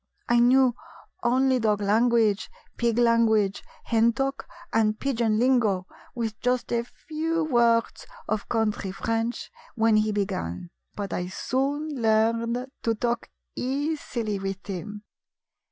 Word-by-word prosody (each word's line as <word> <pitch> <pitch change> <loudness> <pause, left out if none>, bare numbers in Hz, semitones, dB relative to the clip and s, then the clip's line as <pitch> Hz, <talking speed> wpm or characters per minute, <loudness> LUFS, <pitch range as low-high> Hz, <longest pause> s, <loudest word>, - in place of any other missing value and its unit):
I 240 0 +4
knew 250 +1 +5 0.5
only 260 0 +2
dog 215 -3 +1
language, 215 0 +2 0.3
pig 235 -1 0
language, 230 -4 +3 0.2
hen 230 0 +3
talk 275 +3 -2 0.3
and 215 -1 +2
pigeon 235 -5 +1
lingo, 225 -7 +2 0.3
with 225 -3 -3
just 250 -1 0
a 235 0 +1
few 320 +5 -3
words 235 -5 +2 0.2
of 215 -1 -2
country 215 -4 0
French 225 - -2 0.2
when 225 -2 +3
he 215 0 +2
be 205 -1 +1
gan; 170 - -5 0.2
but 200 -3 -4
I 180 - -2
soon 275 +10 -2
learned 230 +2 +2 0.2
to 230 -1 0
talk 235 +1 -2 0.3
easily 260 -6 -2
with 195 0 -5
him. 205 +2 -6
230 Hz, 125 wpm, -26 LUFS, 215-245 Hz, 0.5 s, knew